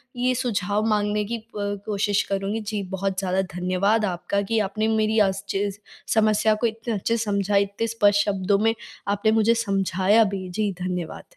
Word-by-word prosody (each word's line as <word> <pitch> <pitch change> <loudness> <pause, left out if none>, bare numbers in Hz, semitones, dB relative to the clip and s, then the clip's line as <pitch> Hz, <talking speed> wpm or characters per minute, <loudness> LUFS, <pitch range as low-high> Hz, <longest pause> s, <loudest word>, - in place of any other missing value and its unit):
ये 250 +1 +1
सुझाव 210 -4 -1
माँगने 210 0 +1
की 235 +3 -3
अ, - - -12 0.4
कोशिश 205 -1 +1
करुँगी। 195 +2 -1
जी, 210 -1 -3
बहुत 190 0 -2
ज़्यादा 190 0 0
धन्यवाद 185 +5 +1
आपका 195 +1 -1
कि 220 +3 0
आपने 215 +1 -1
मेरी 220 0 +2
अस् 195 +1 -5
चीज़ 200 0 -1 0.4
समस्या 215 0 +3
को 235 - +3
इतने 225 +1 -4
अच्छे 225 +3 0
से 225 - -1
समझा 200 -1 0
इतने 200 +3 +1
स्पष्ट 205 -3 +3
शब्दों 200 0 +1
में 225 +1 +3 0.3
आपने 205 +2 +2
मुझे 225 +1 +4
समझाया 195 +2 +3
भी। 195 -3 -3
जी, 205 +3 -1
धन्यवाद। 180 -2 -4
205 Hz, 175 wpm, -24 LUFS, 195-220 Hz, 0.4 s, मुझे